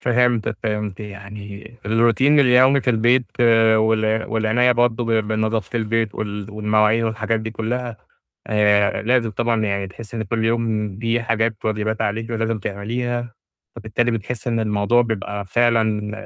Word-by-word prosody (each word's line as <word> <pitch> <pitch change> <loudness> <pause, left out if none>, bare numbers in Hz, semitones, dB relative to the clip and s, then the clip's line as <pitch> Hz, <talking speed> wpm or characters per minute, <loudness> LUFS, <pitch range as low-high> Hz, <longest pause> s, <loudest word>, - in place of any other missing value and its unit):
فهمتِك 120 -3 +1
فهِمت 105 -3 -3
يعني 105 +1 -9
الروتين 120 +6 +3
اليومي 130 +1 +5
في 125 - 0
البيت 120 +2 +3 0.5
وال 110 0 +1
والعناية 115 +3 +2
برضه 120 -1 +1
ب 115 - -3 0.2
بنضافة 110 0 -1
البيت 115 -1 -1
وال 105 -1 -5
والمواعين 105 +1 +2
والحاجات 110 0 -1
دي 110 0 -5
كلّها 115 +1 -4 0.5
آآ 105 -1 +2
لازم 120 0 +1
طبعًا 115 +1 0
يعني 100 -1 -2
تحسّي 110 +4 -10
إن 110 - -2
كل 110 +2 -2
يوم 110 -3 -1
دي 115 +1 0
حاجات 115 -1 0
واجبات 110 0 -1
عليكِ 115 +3 -2
ولازم 115 -1 -1
تعمليها، 120 +4 -4 0.4
فبالتالي 120 +1 -1
بتحسّي 115 +1 -4
إن 115 -1 0
الموضوع 110 +2 +2
بيبقى 105 -3 -4
فعلًا 110 -1 +1
110 Hz, 140 wpm, -21 LUFS, 105-120 Hz, 0.5 s, اليومي